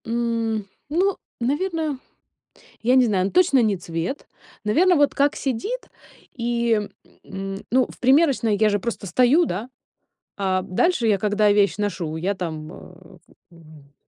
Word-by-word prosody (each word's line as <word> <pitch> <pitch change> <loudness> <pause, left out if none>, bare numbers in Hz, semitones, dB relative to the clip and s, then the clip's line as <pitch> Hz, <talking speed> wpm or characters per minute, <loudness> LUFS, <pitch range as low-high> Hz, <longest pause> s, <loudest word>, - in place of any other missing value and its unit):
М, 230 -2 -1 0.2
ну, 370 +5 +1 0.2
наверное 305 +3 -1 0.8
я 245 +3 +2
не 255 -1 +5
знаю, 190 -4 +1
но - - -2
точно 340 -8 +4
не 210 -3 +1
цвет. 170 - -5 0.4
Наверно, 345 - +3
вот 290 -1 +3
как 285 +1 +2
сидит, 280 - -3 0.5
и, 235 -2 0 0.4
м, 195 0 -6
ну, 255 0 +3
в - - -14
примерочной 260 -5 +3
я 215 +1 +3
же 205 -1 +1
просто 220 0 -5
стою, 255 - +4
да, 210 +3 -4 0.7
а 190 -2 0
дальше 245 - +1
я, 210 -2 +3
когда 210 +1 +2
вещь 205 -1 +2
ношу, 190 -6 -3
я 185 +5 -1
там, 160 -4 -5
э, 180 0 -14 0.3
м, 155 -4 -17
225 Hz, 145 wpm, -22 LUFS, 195-265 Hz, 0.8 s, не